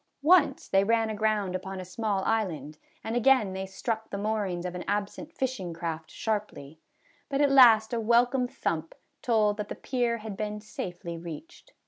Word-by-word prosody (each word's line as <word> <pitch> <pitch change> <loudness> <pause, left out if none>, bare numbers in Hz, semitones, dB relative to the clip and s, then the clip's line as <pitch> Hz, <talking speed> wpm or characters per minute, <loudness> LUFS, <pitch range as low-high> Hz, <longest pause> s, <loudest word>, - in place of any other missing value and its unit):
Once 305 -4 +4
they 195 0 +3
ran 225 +1 +2
aground 210 -3 0
upon 190 +1 -5
a 185 - -6
small 200 +1 -2
island, 155 -9 -2 0.2
and 225 +1 -3
again 245 -5 +4
they 190 0 -4
struck 220 +3 -4
the 200 - -4
moorings 200 -4 -2
of 180 - -3
an 180 - -5
absent 205 +9 -3
fishing 250 - -3
craft 165 -1 -5
sharply; 205 -9 -4 0.5
but 275 -1 -1
at 285 -1 +4
last 235 -4 +7
a 235 - 0
welcome 245 +3 +3
thump 165 -8 -3 0.3
told 215 -3 +2
that 210 -1 -4
the - - -4
pier 245 -2 -1
had 215 -2 -7
been 210 0 -4
safely 175 -5 -6
reached. 295 - -10
210 Hz, 170 wpm, -28 LUFS, 185-235 Hz, 0.5 s, last